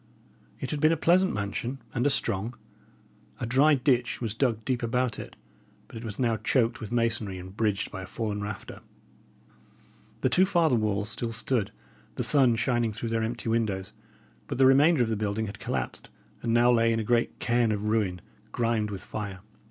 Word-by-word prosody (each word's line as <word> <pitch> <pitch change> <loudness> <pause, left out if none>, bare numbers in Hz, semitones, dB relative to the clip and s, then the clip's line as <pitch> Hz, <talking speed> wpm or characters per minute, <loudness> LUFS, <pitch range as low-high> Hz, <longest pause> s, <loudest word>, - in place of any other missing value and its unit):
It - - -4
had 150 - -2
been 155 +1 +5
a 165 - +2
pleasant 185 +4 +3
mansion 105 +6 -3 0.2
and 125 +2 +1
a - - +4
strong. 115 -2 -1 0.8
A - - -2
dry 135 +6 +4
ditch 125 -2 +1
was 115 -4 -2
dug 115 -2 0
deep 130 -3 0
about 120 0 0
it; - - -9 0.5
but - - -14
it 115 - -7
was 110 -3 -6
now 115 -3 +1
choked 120 0 +1
with 110 - -6
masonry, 115 -5 0
and 95 +1 -10
bridged 105 -3 0
by 95 - -6
a 95 - -8
fallen 105 0 -3
rafter. 105 0 -7 1.4
The - - +2
two 185 +1 +4
farther 170 -8 +3
walls 105 -2 0
still 115 +1 -3
stood, 110 -1 -1 0.4
the - - -1
sun 130 -5 +4
shining 120 -1 0
through 115 +2 -4
their 115 0 0
empty 115 +1 -3
windows; 110 -5 -1 0.5
but - - -4
the 135 - +5
remainder 140 +2 +5
of 115 - -2
the 110 - 0
building 105 +1 -1
had 100 - -8
collapsed, - - -4 0.3
and 115 - -1
now 120 +1 +5
lay 115 -1 +4
in 115 - +1
a - - -1
great 120 +2 +1
cairn 120 -1 +1
of 105 -1 -2
ruin, 105 -5 0 0.3
grimed 115 -3 0
with 100 -2 -6
fire. 100 -3 -6
115 Hz, 190 wpm, -27 LUFS, 105-125 Hz, 1.4 s, been